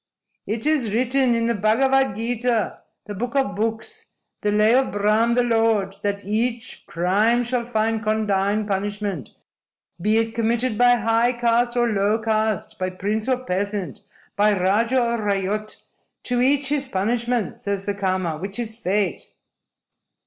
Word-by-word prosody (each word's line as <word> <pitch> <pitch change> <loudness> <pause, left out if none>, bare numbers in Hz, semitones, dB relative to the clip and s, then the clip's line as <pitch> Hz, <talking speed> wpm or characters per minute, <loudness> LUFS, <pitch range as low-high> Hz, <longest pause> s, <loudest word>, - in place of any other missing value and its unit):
"It 220 +4 -2
is 270 -9 +1
written 255 0 +2
in 230 0 0
the 235 - +1
Bhagavad 265 +3 +2
Gita, 230 0 -1 0.3
the 210 - -6
Book 240 +6 -4
of 265 -7 +1
Books, 225 - -3 0.3
the 210 - +1
Lay 210 +2 +4
of 265 +1 +3
Brahm 215 +3 +2
the 245 - +3
Lord, 225 -4 +1
that 200 -1 -2
each 230 +3 -2
crime 205 +8 +2
shall 240 0 -2
find 225 -1 0
condign 210 -1 0
punishment, 200 - -3 0.7
be 215 +4 +2
it 225 0 0
committed 230 +1 0
by 245 +2 +5
high 230 +2 +2
caste 240 0 +1
or 240 0 +3
low 205 +2 +2
caste, 220 -1 -1
by 185 0 -1
prince 210 +5 -2
or 255 -1 0
peasant, 195 - -3 0.3
by 205 -1 +3
raja 225 +8 +2
or 235 -1 0
ryot. 205 +1 -2 0.5
To 245 -1 0
each 270 +1 +2
his 285 -2 0
punishment, 235 +1 -1
says 200 -1 -3
the 205 - -1
Karma, 185 -5 -1
which 195 +4 -5
is 225 -2 -3
fate!" 195 -4 -2
220 Hz, 150 wpm, -22 LUFS, 205-240 Hz, 0.7 s, by